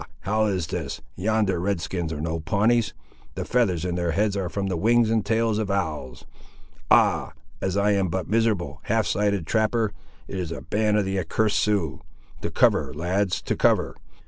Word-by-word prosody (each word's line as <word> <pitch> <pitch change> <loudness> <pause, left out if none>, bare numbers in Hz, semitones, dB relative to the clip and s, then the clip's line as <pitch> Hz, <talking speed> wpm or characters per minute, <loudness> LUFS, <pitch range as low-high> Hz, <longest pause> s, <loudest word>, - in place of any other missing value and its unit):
how 110 +3 +1
is 95 -5 -1
this! - - -4 0.2
yonder 105 -1 +1
Red 100 +1 0
skins 85 -1 -3
are 75 - -4
no 80 +1 -2
Pawnees! 105 +6 +1 0.4
The - - -3
feathers 95 -9 +1
in 90 - -1
their 85 -2 -1
heads 105 +3 +1
are 95 -3 -2
from 100 +3 -3
the 95 -2 -1
wings 115 +5 +3
and 110 -2 +2
tails 110 0 +1
of 105 -2 -2
owls.—Ah! 80 -10 -1 0.3
as 95 +1 -1
I 100 +1 +3
am 100 -2 +2
but 90 0 -2
a - - -16
miserable, 105 -11 +1
half 110 0 +1
sighted, 100 -3 0
trapper, 110 +2 +1 0.4
it 95 - -5
is 85 -3 -3
a - - -5
band 105 0 +1
of 105 - +1
the 95 0 -1
accursed 105 +5 +1
Siouxes! 90 -11 0 0.4
To - - -2
cover, 65 - +3
lads, 90 +4 0
to - - -1
cover. - - +2
100 Hz, 185 wpm, -25 LUFS, 85-110 Hz, 0.4 s, wings